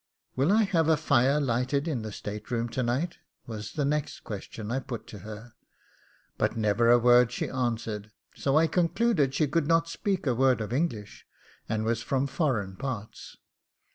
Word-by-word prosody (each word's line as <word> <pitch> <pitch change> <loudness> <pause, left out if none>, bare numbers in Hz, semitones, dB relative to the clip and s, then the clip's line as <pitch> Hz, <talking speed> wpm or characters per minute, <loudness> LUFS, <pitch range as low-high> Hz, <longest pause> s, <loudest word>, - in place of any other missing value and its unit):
'Will 140 +8 +2
I 220 +2 +5
have 170 -6 +1
a 160 - +5
fire 135 +3 +3
lighted 135 +3 0
in 140 -8 -1
the 110 -1 -6
state 105 +1 -7
room 120 -1 -1
to 130 - -2
night?' 130 +9 -1 0.3
was 110 -2 -7
the 145 -3 0
next 150 +1 -1
question 105 +1 -7
I 130 - 0
put 125 -3 -6
to 105 - -10
her, 110 +4 -10 0.9
but - - 0
never 110 +2 +2
a 120 - +8
word 120 0 +5
she - - -2
answered; 115 -4 -2 0.2
so 140 +1 +1
I 160 - +5
concluded 170 - +1
she 155 - +2
could 150 +1 0
not 165 0 +3
speak 190 +2 -2
a 130 - +2
word 130 +1 +3
of 110 +1 -4
English, 120 -9 -3 0.4
and 110 0 0
was 115 0 0
from 135 +3 0
foreign 130 - -1
parts. 120 -5 -6
125 Hz, 180 wpm, -28 LUFS, 110-150 Hz, 0.9 s, a